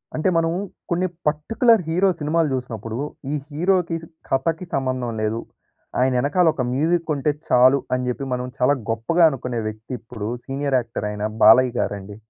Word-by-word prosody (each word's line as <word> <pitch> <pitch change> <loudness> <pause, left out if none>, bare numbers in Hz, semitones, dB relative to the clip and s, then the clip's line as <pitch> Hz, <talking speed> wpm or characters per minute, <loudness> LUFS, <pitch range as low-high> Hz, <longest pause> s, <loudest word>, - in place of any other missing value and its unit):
అంటే 155 +5 +1
మనము 165 +1 +1 0.3
కొన్ని 180 +2 +1 0.2
పర్టిక్యులర్ 220 +9 +3
హీరో 185 +4 +3
సినిమాలు 155 +1 +1
చూసినప్పుడు, 115 -3 -5 0.4
ఈ - - +1
హీరోకి, 175 +2 +1 0.3
కథకి 165 +6 0
సంబంధం 130 -3 -1
లేదు. 110 +2 -1 0.6
ఆయన 130 +1 +3
వెనకాల 145 +7 +2
ఒక 135 - -2
మ్యూజిక్ 165 +4 +1
ఉంటే 145 +2 +1 0.2
చాలు, 130 +3 +5
అని 125 0 -1
చెప్పి 130 +3 -3
మనం 125 0 -2
చాలా 135 +3 +4
గొప్పగా 115 +10 +2
అనుకునే 125 -4 -4
వ్యక్తి 110 +2 -11
ఇప్పుడు 110 -2 -6 0.2
సీనియర్ 135 0 0
యాక్టర్ 115 -3 -4
అయిన 105 0 -3 0.2
బాలయ్య 125 +3 +7
గారండి. 100 0 -3
135 Hz, 150 wpm, -22 LUFS, 120-165 Hz, 0.6 s, బాలయ్య